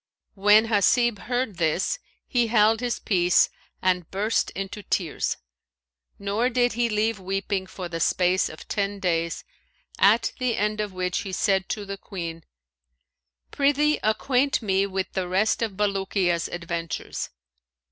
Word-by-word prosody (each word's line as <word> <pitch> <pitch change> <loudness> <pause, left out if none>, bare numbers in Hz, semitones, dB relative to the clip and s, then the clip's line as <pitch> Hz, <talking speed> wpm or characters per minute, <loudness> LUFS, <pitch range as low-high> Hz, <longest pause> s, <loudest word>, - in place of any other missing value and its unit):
When 210 +2 +5
Hasib 225 +1 +3
heard 245 -5 -2
this, 170 - +1 0.3
he 240 -3 +1
held 220 0 +4
his 245 -1 -1
peace 180 -3 +3 0.3
and 180 -3 +1
burst 210 +4 0
into 195 +2 -5
tears; 175 -5 -1 0.8
nor 205 +5 0
did 245 0 +2
he 235 +1 +1
leave 215 0 0
weeping 195 0 -2
for 185 -2 -6
the 165 -1 -5
space 180 +3 +2
of 155 - -11
ten 200 -1 -2
days, 170 -3 -1 0.6
at 210 +4 +4
the 250 -3 +1
end 210 +1 0
of 210 -1 -3
which 180 -1 -1
time - - -4
he 195 - -5
said 190 -1 +1
to 210 -2 -3
the 200 0 -5
Queen, 170 -5 -6 1.1
"Prithee 290 +2 +2
acquaint 255 +4 +1
me 195 -1 +2
with 190 -1 -3
the 185 -2 -1
rest 215 +6 +1
of 225 -3 -1
Bulukiya's 195 -4 0
adventures." 170 -1 -4
200 Hz, 145 wpm, -25 LUFS, 185-225 Hz, 1.1 s, When